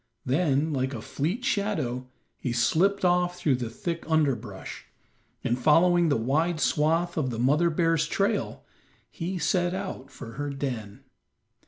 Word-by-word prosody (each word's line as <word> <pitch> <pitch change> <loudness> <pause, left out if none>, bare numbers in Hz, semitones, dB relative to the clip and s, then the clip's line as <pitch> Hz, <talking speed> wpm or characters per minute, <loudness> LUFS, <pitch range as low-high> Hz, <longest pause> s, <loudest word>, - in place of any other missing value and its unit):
Then, 150 +1 +1
like 130 0 -1
a - - -4
fleet 180 - -2
shadow, 155 - -1 0.3
he 120 - -2
slipped 180 +12 +2
off 180 0 +2
through 155 -5 +2
the 120 -2 -4
thick 165 +8 -4
underbrush, 130 -11 -1 0.6
and 120 +2 0
following 170 +5 +4
the 145 - +2
wide 155 +8 +1
swath 165 +4 +1
of 140 -5 0
the 115 - -4
mother 145 +8 +3
bear's 165 -1 +1
trail, 200 +5 -1 0.5
he 180 +1 -4
set 175 0 +1
out 185 -9 -5
for 115 -4 -9
her 145 - -2
den. 125 -7 -5
155 Hz, 145 wpm, -27 LUFS, 130-175 Hz, 0.6 s, following